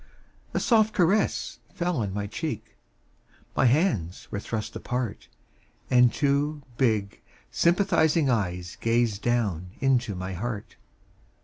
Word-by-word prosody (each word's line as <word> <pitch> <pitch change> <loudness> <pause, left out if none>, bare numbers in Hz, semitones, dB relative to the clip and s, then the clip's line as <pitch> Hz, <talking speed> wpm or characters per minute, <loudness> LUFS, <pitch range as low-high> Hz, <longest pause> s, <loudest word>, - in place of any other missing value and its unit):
A - - +3
soft 220 -2 +3
caress 195 +4 +1 0.2
fell 175 -1 -1
on 105 -4 -1
my 100 +1 -3
cheek, 115 0 -5 0.8
My - - +3
hands 120 - +1
were 105 - -2
thrust 110 +1 -4
apart. 125 -3 -3 0.6
And 125 -1 +6
two 145 +1 0
big 110 -6 0 0.3
sympathizing 170 -4 +3
eyes 90 -7 -1
Gazed 115 -3 +1
down 105 -8 0
into 125 -6 +1
my 95 +1 -4
heart. 105 +3 -5
120 Hz, 115 wpm, -26 LUFS, 100-150 Hz, 0.8 s, And